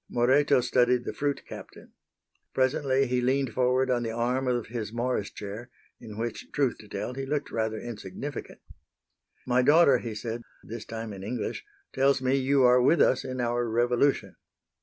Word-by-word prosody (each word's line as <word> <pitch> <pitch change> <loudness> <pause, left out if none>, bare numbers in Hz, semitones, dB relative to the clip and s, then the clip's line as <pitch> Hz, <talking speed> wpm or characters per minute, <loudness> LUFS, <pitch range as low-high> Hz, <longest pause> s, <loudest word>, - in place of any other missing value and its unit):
Moreto 130 +3 +3
studied 125 0 +2
the - - -4
fruit 145 -1 -2
captain. - - -11 0.6
Presently 135 0 +2
he 125 -1 0
leaned 130 +1 +1
forward 130 +1 +2
on 120 -1 +1
the 115 - -2
arm 125 +3 -1
of 120 -2 0
his 110 -2 -5
Morris 120 -3 -1
chair, 105 +4 -8 0.3
in 105 -2 -10
which, 115 0 -5
truth 140 -4 0
to 105 - -13
tell, 125 - -4
he 135 +1 -5
looked 145 +2 -2
rather 110 -1 -1
insignificant. 120 +5 -7 0.8
"My 125 0 +3
daughter," 150 +3 +5
he 115 -3 -6
said, 115 +2 -4 0.2
this 115 0 -8
time 115 -1 -6
in 95 - -9
English, 110 +4 -4 0.3
"tells 135 +1 +3
me 130 0 0
you 135 0 +3
are 125 0 +6
with 155 +6 +4
us 130 - +3
in 130 0 -5
our 120 0 0
revolution." 120 +4 +1
125 Hz, 170 wpm, -27 LUFS, 115-130 Hz, 0.8 s, are